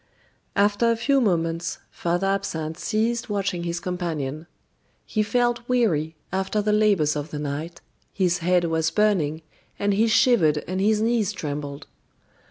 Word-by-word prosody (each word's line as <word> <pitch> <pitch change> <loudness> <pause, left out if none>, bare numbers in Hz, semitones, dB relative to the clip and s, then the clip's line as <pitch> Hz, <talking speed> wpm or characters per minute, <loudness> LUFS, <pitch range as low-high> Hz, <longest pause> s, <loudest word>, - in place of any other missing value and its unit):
After 205 +3 +3
a 230 - +3
few 275 +4 +2
moments, 170 -5 0
Father 175 +2 -1
Absinthe 170 -5 -2
ceased 230 +2 -1
watching 195 -4 -1
his 170 0 -2
companion. 165 -4 -4 0.6
He 215 - -1
felt 240 +2 0
weary 165 -11 +1 0.2
after 190 +2 0
the 210 0 +1
labors 200 -9 +3
of 150 +1 -4
the 150 - -5
night, 150 +3 -5 0.3
his 180 -3 +1
head 180 +1 +2
was 160 -1 +1
burning, 160 -5 +1 0.3
and 200 0 +1
he 220 +3 +3
shivered 210 - +3
and 185 +1 -2
his 215 +1 +2
knees 225 -3 +1
trembled. 145 -3 -5
185 Hz, 145 wpm, -24 LUFS, 160-215 Hz, 0.6 s, After